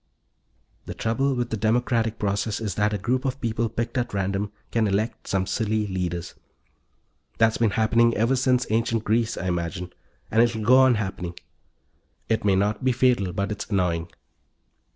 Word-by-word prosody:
The - - -6
trouble 135 +4 0
with 120 -1 -2
the 110 - -1
democratic 115 +1 +1
process 100 +1 -1
is 105 -4 -3
that 105 +2 +1
a 105 - -1
group 125 +6 -1
of 135 0 -2
people 115 -1 -1
picked 115 +4 -2
at 120 -3 -3
random 100 +1 -1 0.2
can 115 -2 +2
elect 105 +4 -2
some 95 -1 0
silly 110 +1 -1
leaders. 90 -3 -3 1.0
That's 115 0 +3
been 115 -2 +3
happening 115 +1 +3
ever 115 +5 +2
since 125 -1 +2
ancient 115 0 +1
Greece, 115 +1 0
I 95 - -4
imagine, 90 0 -3 0.4
and 115 - +4
it'll 115 -2 +1
go 130 +4 +6
on 130 -2 +5
happening. 95 -4 -4 0.9
It 110 -1 +1
may 100 -2 +3
not 105 +6 0
be 130 - +3
fatal, 120 -6 +2
but 100 +3 -2
it's 105 - -5
annoying. 90 -4 0
110 Hz, 170 wpm, -24 LUFS, 100-120 Hz, 1.0 s, go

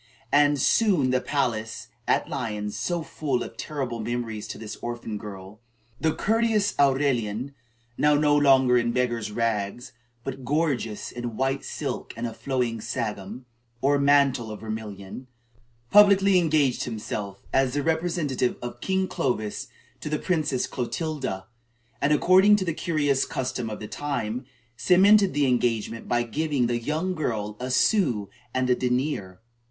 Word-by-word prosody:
And 145 0 +4
soon 200 - +3
in 130 - +2
the 130 0 +2
palace 115 -6 -2 0.2
at - - +2
Lyons, 105 -1 -3
so 170 +8 -2
full 140 -6 -2
of - - -9
terrible 130 -6 -4
memories 115 -1 -3
to - - -6
this 110 -1 -7
orphan 120 -3 -5
girl, 100 -1 -9 0.4
the 160 - +2
courteous 220 +1 +1
Aurelian, 135 -3 +1 0.5
now 150 0 +4
no 145 0 +3
longer 130 -4 +5
in 120 0 0
beggar's 120 -3 -1
rags, 115 +2 -2 0.3
but 135 -1 -6
gorgeous 135 -6 -1
in 120 -2 -5
white 135 +1 0
silk - - -5
and 115 - -3
a 115 - -4
flowing 115 -1 -2
sagum, 110 0 -4 0.3
or 140 +3 +2
mantle 140 -4 +3
of 105 - -7
vermilion, 110 +1 -7 0.6
publicly 200 -2 +6
engaged 150 -6 +2
himself, 105 -3 -5
as 135 0 +2
the 145 - 0
representative 160 -6 0
of 120 0 -7
King 190 0 0
Clovis, 110 - -2 0.3
to - - -5
the 150 - 0
Princess 155 -6 0
Clotilda; 130 - -3 0.6
and, 140 - +2
according 185 +7 +6
to 200 -2 -1
the 170 - -1
curious 145 -5 +1
custom 125 -3 -3
of 105 - -6
the 105 - -6
time, 125 -3 -3 0.3
cemented 195 - +5
the 145 -1 +3
engagement 115 -3 0
by 120 0 +1
giving 145 +3 -1
to 120 - -1
the 120 - 0
young 160 +8 -1
girl 110 - -2
a 125 +1 -4
sou 130 - +2 0.2
and 130 +1 0
a 125 - +4
denier. 125 -7 -2
130 Hz, 150 wpm, -25 LUFS, 115-150 Hz, 0.6 s, publicly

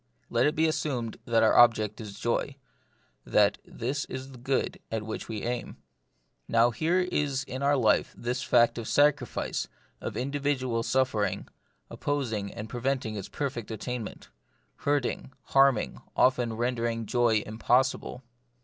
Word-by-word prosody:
Let 120 +3 +3
it 150 - 0
be 160 - +3
assumed 130 -7 -1
that 115 -1 +3
our 110 - +4
object 110 -3 +5
is 100 -2 -8
joy, 125 +3 -1 0.7
that 105 -1 +3
this 135 +5 -3
is 130 +1 -7
the 130 - -12
good 130 +2 -1
at 110 -1 -2
which 110 - -5
we 110 -2 -4
aim. 120 0 -3 0.7
Now 115 +1 +4
here 165 +10 +1
is 145 -7 -1
in 130 0 -6
our 140 +1 +3
life 110 -5 +3
this 125 +2 -2
fact 120 -2 +3
of 115 - -6
sacrifice, 145 -4 +1 0.3
of - - -4
individual 130 -3 -1
suffering, 120 -4 0 0.4
opposing 115 -9 -2
and 105 - -7
preventing 125 -1 -2
its 100 -2 -6
perfect 130 -6 -4
attainment; 115 +1 -5 0.5
hurting, 145 -2 -1
harming, 135 -4 +3
often 125 -3 +3
render 120 +1 -1
ing 115 -1 -2
joy 115 -3 +2
impossible. 125 +3 0
120 Hz, 140 wpm, -28 LUFS, 115-135 Hz, 0.7 s, object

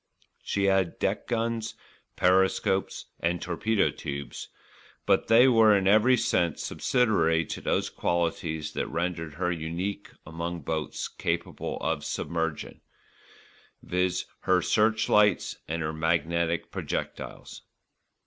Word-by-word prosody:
She 100 - -1
had 95 -3 +2
deck - - -1
guns, 115 -1 -2 0.4
periscopes 95 +1 +2
and 85 +1 0
torpedo 95 +6 0
tubes; 70 0 -6 0.6
but - - +2
they 120 +3 +7
were 110 -4 +6
in 95 -1 0
every 110 +5 +5
sense 85 -6 0
subsidiary 85 -10 +2
to - - -6
those - - 0
qualities 80 -2 -2
that - - -2
rendered 80 -2 -3
her 90 +2 -1
unique 85 +4 -4 0.2
among 85 +2 -5
boats 80 +1 -3
capable 85 0 -3
of 80 -2 -1
submersion, 80 -2 -3 1.0
viz., 90 0 0
her 95 -1 +2
searchlights 105 -1 +2
and 80 +1 -2
her 80 0 -2
magnetic 85 +1 0
projectiles. - - -5
85 Hz, 110 wpm, -27 LUFS, 80-100 Hz, 1.0 s, they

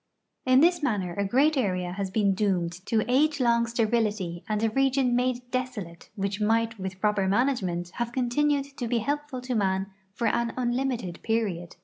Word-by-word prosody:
In 255 +1 +6
this 345 +1 +4
manner 200 -10 -1
a 200 - -1
great 275 +10 +3
area 185 -8 0
has 195 +1 -3
been 200 0 +2
doomed 190 -4 0 0.2
to 220 -2 +1
age 290 +4 +2
long 235 -2 +3
sterility 215 -6 0
and 215 0 0
a 225 - +2
region 265 0 +2
made 250 0 +1
desolate 235 -10 -4
which 200 0 -2
might 225 +1 +1
with 190 0 -5
proper 205 -2 +1
management 190 -6 0
have 235 0 -2
continued 275 +3 +1
to 240 - -3
be 240 +1 +1
helpful 285 +2 -2
to 255 0 -3
man 195 -2 0 0.2
for 235 - -2
an 235 +1 +1
unlimited 245 -7 -2
period. 200 -7 -2
230 Hz, 170 wpm, -27 LUFS, 195-255 Hz, 0.2 s, In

